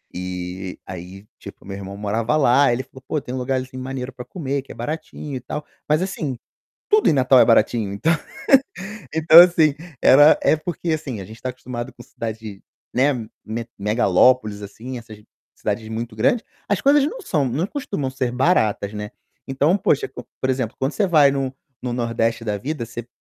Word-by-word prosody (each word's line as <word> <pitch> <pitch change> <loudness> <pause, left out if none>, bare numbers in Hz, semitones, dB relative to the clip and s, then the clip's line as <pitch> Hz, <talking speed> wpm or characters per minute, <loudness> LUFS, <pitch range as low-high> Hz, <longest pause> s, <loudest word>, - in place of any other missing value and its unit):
e 90 +1 -5
aí, 95 +2 -9
tipo, - - -11
o - - -14
meu 100 - -5
irmão 100 0 -7
morava 110 +5 0
lá, 140 -2 +4
ele 125 +2 -1
falou: 130 - -16
"Pô, 155 - 0
tem 125 - -7
um - - -3
lugarzinho 130 0 -3
maneiro 130 0 -5
para 125 -1 -9
comer, 140 -2 -3
que - - -14
é - - -9
baratinho, 150 +2 -5
e - - -3
tal". 150 +4 -6 0.2
Mas, 155 +3 +3
assim, 150 -9 -3 0.5
tudo 425 0 +4
em - - +4
Natal 130 -1 +5
é - - +7
baratinho, 110 -3 +3
então 155 +11 +1 1.0
então, 160 +1 +9
assim, 165 -4 +5 0.3
era 145 +3 +7
é - - +4
porque, 165 +1 -4
assim, 140 -8 -3
a - - -6
gente 110 +4 -11
está 130 - -5
acostumado 125 0 -7
com 120 - -13
cidade, 110 -4 -7 0.3
né, 135 +4 +4 0.3
me 115 +1 -4
megalópoles, 105 +1 +3
assim, 115 +6 -7
essas 110 -2 -12 0.4
cidades 110 +1 -3
muito 115 +1 -5
grandes, 220 - +2 0.2
as 205 - +1
coisas 280 0 +5
não - - -5
são 150 - 0
não 155 +9 -1
costumam 200 - -3
ser 130 -1 -2
baratas, 125 - +1
né. 105 0 -5 0.4
Então, 145 +7 +2
poxa, 145 -6 +2
co 125 - -10 0.2
por 130 - +1
exemplo, 130 -3 -2
quando 135 +3 -1
você 205 - +1
vai 150 -6 +5
no 135 -1 -2 0.3
no 125 -1 -2
Nordeste 115 -1 -1
da 105 -2 -1
vida, 140 +3 -4
você 115 0 -7
125 Hz, 190 wpm, -22 LUFS, 110-145 Hz, 1.0 s, então